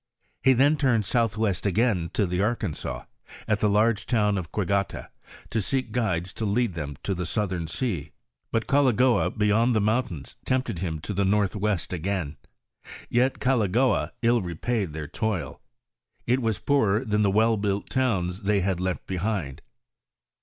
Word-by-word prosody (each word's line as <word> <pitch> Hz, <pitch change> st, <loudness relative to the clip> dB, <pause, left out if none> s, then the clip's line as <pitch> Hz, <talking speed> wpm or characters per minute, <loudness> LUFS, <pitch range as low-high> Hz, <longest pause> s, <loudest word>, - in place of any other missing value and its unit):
He 135 Hz, -, +5 dB
then 140 Hz, +5 st, +4 dB
turned 120 Hz, -7 st, +2 dB
southwest 110 Hz, -4 st, 0 dB
again 100 Hz, -4 st, +1 dB
to 105 Hz, -, +2 dB
the 90 Hz, +1 st, -1 dB
Arkansas, 105 Hz, -6 st, -2 dB, 0.4 s
at 105 Hz, -1 st, +1 dB
the 105 Hz, -, +2 dB
large 110 Hz, +2 st, +2 dB
town 105 Hz, -4 st, +2 dB
of 90 Hz, -5 st, -4 dB
Quigata, 100 Hz, -2 st, -1 dB, 0.4 s
to 110 Hz, -, +1 dB
seek 130 Hz, +2 st, -2 dB
guides 95 Hz, -7 st, -1 dB
to -, -, -5 dB
lead 110 Hz, 0 st, +1 dB
them 75 Hz, -4 st, -5 dB
to 100 Hz, -, -1 dB
the 90 Hz, -1 st, -3 dB
southern 90 Hz, -2 st, -2 dB
sea; 80 Hz, -, -3 dB, 0.4 s
but 115 Hz, -1 st, 0 dB
Goligoa 130 Hz, -3 st, +3 dB
beyond 110 Hz, +3 st, +2 dB
the -, -, +4 dB
mountains 105 Hz, -, -1 dB
tempted 130 Hz, -9 st, -1 dB
him 80 Hz, -3 st, -2 dB
to 105 Hz, -, -4 dB
the 100 Hz, +1 st, +1 dB
northwest 100 Hz, -1 st, 0 dB
again; 90 Hz, -4 st, -2 dB, 0.7 s
yet 125 Hz, +3 st, +2 dB
Goligoa 125 Hz, -1 st, +1 dB
ill 120 Hz, 0 st, +4 dB
repaid 90 Hz, +1 st, -2 dB
their 75 Hz, -1 st, -5 dB
toil; 105 Hz, 0 st, -3 dB, 0.6 s
it 125 Hz, +2 st, +2 dB
was 110 Hz, -4 st, 0 dB
poorer 120 Hz, -5 st, +1 dB
than 105 Hz, -2 st, +1 dB
the 100 Hz, -, +3 dB
well 110 Hz, +3 st, +3 dB
built 100 Hz, -1 st, -1 dB
towns 100 Hz, -8 st, 0 dB
they 100 Hz, 0 st, +1 dB
had 95 Hz, -1 st, 0 dB
left 90 Hz, -1 st, -2 dB
behind. 90 Hz, -7 st, -3 dB
105 Hz, 155 wpm, -26 LUFS, 90-115 Hz, 0.7 s, He